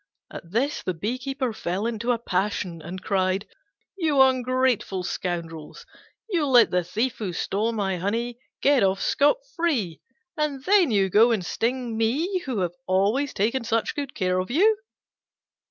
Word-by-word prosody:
At 165 - -9
this 255 +10 0 0.2
he 255 +7 -3
fell 215 -7 -2
into 235 +1 -1
a 240 - +1
passion 185 -5 -2
and 180 +4 -8
cried, 190 +1 0 0.5
"You 315 -7 +1
ungrateful 255 -6 +2
scoundrels, 165 -4 -5 0.4
you 340 -9 0
let 245 -3 +6
the 180 0 +1
thief 225 +8 -2
who 205 -5 -3
stole 210 +6 -1
my 195 -4 -1
honey 230 +6 -2 0.2
get 280 -2 +4
off 195 0 +2
scot 290 - +3 0.2
free, 230 - -1 0.3
and 300 -4 -2
then 380 -2 +4
you 195 -4 +2
go 225 +5 +6
and 205 -6 0
sting 240 +2 -2
me 300 - 0
who 235 -7 -1
have 175 -1 -1
always 205 +10 +1
taken 230 +5 0
such 225 0 0 0.2
care 185 -2 0
of 185 - -3
you!" 400 - +4
225 Hz, 150 wpm, -25 LUFS, 190-265 Hz, 0.5 s, let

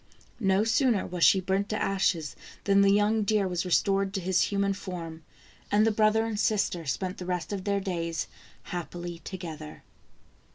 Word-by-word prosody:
No 195 -2 +3
sooner 225 -1 +2
was 175 -1 -2
she 190 - +6
burnt 190 +2 -1
to 215 - -1
ashes 190 -6 0 0.3
than 200 0 +4
the 200 - +5
young 210 +2 +3
deer 205 -1 +1
was 180 0 -2
restored 195 +2 +1
to - - 0
his 185 0 +1
human 200 -1 +1
form, 170 -4 -7 0.5
and 210 +1 +4
the 225 - +3
brother 215 +1 +3
and 220 -2 -3
sister 200 -7 0
spent 180 +8 -2
the 180 - -6
rest 180 +2 -2
of 190 -2 -4
their 200 -1 +1
days 170 -4 -2 0.4
happily 175 -1 -6
together. 160 -5 -8
195 Hz, 170 wpm, -28 LUFS, 175-205 Hz, 0.5 s, she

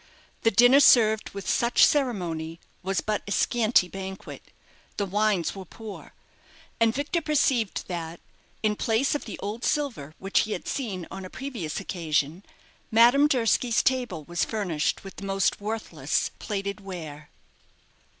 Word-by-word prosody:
The 225 - +4
dinner 245 +6 +6
served 220 -6 +5
with 200 -2 -8
such 240 -1 +4
ceremony 175 - -1 0.2
was 190 +1 -1
but 215 -1 -1
a - - -5
scanty 225 -4 +3
banquet 190 0 -8 0.6
the 205 - 0
wines 200 -3 +1
were 195 - -7
poor 215 +3 -10 0.7
and 230 -1 +4
Victor 290 +7 -1
perceived 270 - +1
that, 170 -2 -5 0.4
in 210 -1 +2
place 225 +6 +1
of 295 - -3
the 215 - -7
old 210 +4 -4
silver 235 - -2
which 195 +1 +1
he 215 - 0
had - - -6
seen 200 -10 -3
on 190 0 -7
a 185 - -8
previous 230 - -5
occasion, 165 -2 -1 0.5
Madame 240 +6 +6
Durski's 240 -3 +2
table 245 -11 0
was 175 +2 -1
furnished 180 -9 -1
with 195 -2 -10
the 200 - -7
most 195 0 0
worthless 205 -9 -2
plated 200 -1 -3
ware. 160 -7 -8
205 Hz, 145 wpm, -26 LUFS, 180-235 Hz, 0.7 s, dinner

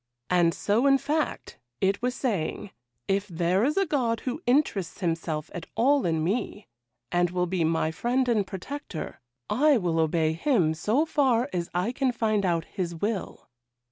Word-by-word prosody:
And 175 -2 +4
so, 225 +7 +2
in 275 0 +6
fact, 300 +3 -2 0.2
it 195 +3 +1
was 250 +1 -1
saying 205 - -2 0.4
"If 195 +1 0
there 180 +2 +1
is 295 +7 +1
a 390 - +3
God 245 -8 0
who 265 +5 -4
interests 245 - +1
himself 165 -2 -2
at 170 -2 -6
all 270 +1 +3
in 160 -2 0
me, 205 +2 -2 0.5
and 175 0 +2
will 180 0 0
be 180 -1 -1
my 160 0 +1
friend 245 +9 0
and 215 -5 +1
protector, 195 - -6 0.3
I 285 +5 +4
will 175 -5 0
obey 160 0 +2
Him 170 - +2
so 220 - +1
far 270 -4 +2
as 175 -1 -2
I 180 +6 +1
can 260 0 0
find 215 -4 0
out 165 -2 0
His 175 -4 -4
will." 200 +3 -3
200 Hz, 170 wpm, -27 LUFS, 170-250 Hz, 0.5 s, in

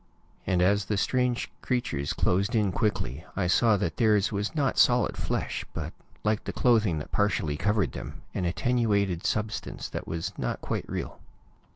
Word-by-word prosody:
And 90 -1 +3
as 100 +1 +3
the 105 +1 -1
strange 125 +2 0
creatures 70 - -1
closed 95 +5 +1
in 105 -3 +2
quickly, 90 - -1
I 95 - 0
saw 110 +4 +4
that 85 -4 -2
theirs 105 -3 +3
was 105 +7 -2
not 140 -4 +1
solid 125 0 +4
flesh, - - -2
but, - - -4 0.3
like 105 0 0
the - - -2
clothing 110 -9 +3
that 75 - -6
partially 85 -7 +1
covered 100 - +1
them, - - -8
an 90 - -1
attenuated 100 -3 +1
substance 110 0 -2
that - - -5
was 80 0 -3
not - - -2
quite - - -3
real. - - -4
105 Hz, 165 wpm, -28 LUFS, 90-115 Hz, 0.3 s, saw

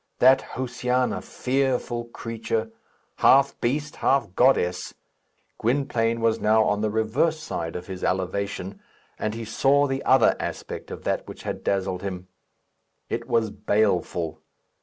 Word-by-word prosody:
That 130 +1 +6
Josiana, 125 0 -1
fearful 125 -2 -1
creature! 115 -1 -3 0.5
half 140 +1 +4
beast, 145 +5 -1
half 135 -9 +1
goddess! 95 -8 +2 0.6
Gwynplaine 115 -2 0
was 115 0 +2
now 110 +1 +4
on 105 -1 +1
the 110 - +1
reverse 120 +10 +1
side 85 - -4
of 90 - -5
his 95 -1 -7
elevation, 95 +1 -2 0.4
and 110 0 -2
he 115 0 -5
saw 140 +6 +3
the 135 -1 -2
other 130 -3 +5
aspect - - -5
of - - -8
that - - -1
which - - -10
had - - -4
dazzled 95 -2 -1
him. 95 -2 -6 0.8
It - - -3
was 110 -2 +1
baleful. 90 -7 0
115 Hz, 135 wpm, -25 LUFS, 100-130 Hz, 0.8 s, That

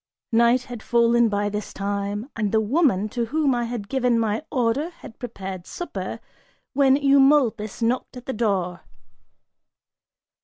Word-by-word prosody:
Night 235 +2 +4
had 245 -3 -8
fallen 235 0 +3
by 205 0 0
this 210 0 -4
time, 200 +2 -3
and 215 -3 -1
the 220 - +3
woman 220 - +2
to 235 +1 -2
whom 285 +2 +1
I 240 -1 0
had 230 -4 -5
given 250 -2 +1
my 220 0 0
order 255 +4 0
had 330 -9 -14
prepared 190 -6 -7
supper, 350 - -5 0.5
when 270 -1 +4
Eumolpus 270 -6 +3
knocked 250 +2 -1
at 250 - -10
the 265 - -3
door. 195 -6 -1
235 Hz, 145 wpm, -23 LUFS, 210-260 Hz, 0.5 s, Night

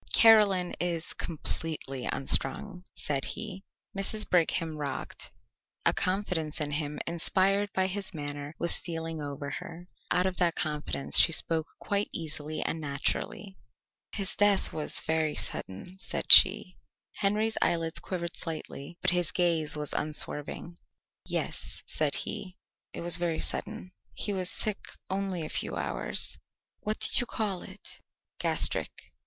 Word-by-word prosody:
"Caroline 205 -5 +6
is 170 -2 -1
completely 155 -5 -4
unstrung," 180 +8 +1
said 140 -2 -2
he. 190 +1 -4 0.3
Mrs. 210 +2 +3
Brigham 165 -2 +1
rocked. 145 -2 -5 0.6
A - - +4
confidence 185 -5 -2
in 150 -1 -3
him 145 0 -3
inspired 190 +4 +3
by 190 - +1
his 190 +1 -2
manner 145 -2 -6
was 170 - +4
stealing 165 -2 -4
over 140 0 -6
her. 170 +2 -8 0.2
Out 180 +1 +1
of 185 -1 -2
that 175 -2 +1
confidence 150 -2 0
she - - +6
spoke 160 0 +2
quite 200 0 -2
easily 155 -1 -4
and 160 - -3
naturally. 150 +7 -3 0.5
"His 195 -3 0
death 205 -1 +2
was 155 -1 +2
very 160 -1 -1
sudden," 175 - -5
said - - -3
she. - - +9 0.4
Henry's 215 +2 0
eyelids 165 -1 0
quivered 170 -2 -5
slightly 160 -1 -6
but - - +4
his 175 -2 +1
gaze 165 -4 +1
was 150 -1 -1
unswerving. 150 +2 -3 0.5
"Yes," - - -4
said - - +1
he; 200 -4 -5 0.3
"it - - -7
was 170 0 +5
very 170 -2 -1
sudden. 215 -4 -2 0.2
He 205 - -2
was 185 -2 0
sick 210 -2 -1 0.3
only 190 -4 -2
a - - -7
few - - -3
hours." - - -2 0.4
"What 215 +1 -3
did - - +4
you 245 - -1
call 205 -6 -3
it?" 195 +1 -10 0.4
"Gastric." - - +3
170 Hz, 135 wpm, -28 LUFS, 155-190 Hz, 0.6 s, she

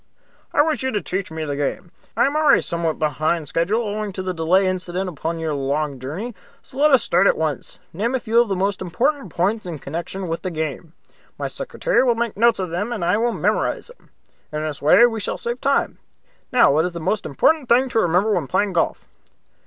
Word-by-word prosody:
"I - - +4
wish 315 -1 -1
you 260 - 0
to 205 - 0
teach 190 +1 -3
me 160 0 -5
the 145 -1 -3
game. 145 +4 -3 0.3
I - - +4
am 280 +2 0
already 310 -1 +5
somewhat 170 -2 -1
behind 155 +2 0
schedule 195 +11 0
owing 210 -1 -3
to 185 - -4
the 185 0 -2
delay 175 +4 +2
incident 185 0 -2
upon 165 0 -4
your 160 -2 -2
long 140 0 -2
journey, 170 - -5 0.3
so 260 - -11
let 300 +1 +5
us 265 -6 +5
start 180 +3 +3
at - - +3
once. 155 -3 -3 0.2
Name 230 +9 -1
a - - 0
few 235 0 +3
of 240 - 0
the 195 - 0
most 195 +1 -1
important 235 - -1
points 195 +5 -1
in 165 -3 -5
connection 170 +7 -5
with 165 0 -3
the 185 - -3
game. 160 0 -5 0.4
My - - -4
secretary - - 0
will 245 -3 +3
make 235 -1 -2
notes 235 +3 +4
of 185 -3 -3
them, 205 +7 -2
and 210 -8 -2
I 180 - +3
will 235 +2 +1
memorize 470 - -1
them. - - -29 0.4
In 150 0 -3
this 155 -2 -4
way 155 +11 +7
we 225 -2 -1
shall 205 - -3
save 240 +1 -3
time. 275 0 0 0.5
Now, 240 - +5
what 160 +3 +2
is 180 - -3
the 170 - -5
most 200 +6 -1
important 280 - +2
thing 255 +3 +4
to 225 - +1
remember 185 +3 +2
when 170 -8 -1
playing 200 +8 0
golf?" 170 - 0
185 Hz, 225 wpm, -21 LUFS, 160-235 Hz, 0.5 s, way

